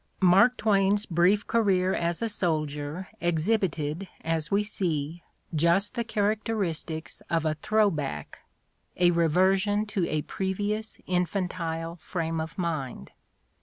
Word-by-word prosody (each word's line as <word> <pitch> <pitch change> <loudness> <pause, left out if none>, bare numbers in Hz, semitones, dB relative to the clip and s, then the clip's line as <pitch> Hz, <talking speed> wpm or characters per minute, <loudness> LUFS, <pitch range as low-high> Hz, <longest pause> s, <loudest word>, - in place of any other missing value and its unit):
Mark 195 +7 +5
Twain's 205 -1 +2
brief 180 +5 +3
career 190 -5 +2
as 170 +5 -1
a - - +1
soldier 155 -3 -2
exhibited, 170 -1 0
as 165 -1 -1
we 200 +1 +2
see, 170 -5 -2 0.3
just 170 +7 +2
the 240 -2 -1
characteristics 205 -7 -2
of 165 -1 +1
a 155 - +2
"throw 215 +6 +2
back," 140 - -5 0.6
a 175 -1 +5
reversion 190 +5 +3
to 195 -5 -1
a 155 -1 0
previ 195 +2 -1
ous 220 0 -8
infantile 180 -2 -2
frame 165 -1 -3
of 160 - -7
mind. 150 - -3
180 Hz, 125 wpm, -27 LUFS, 160-205 Hz, 0.6 s, Mark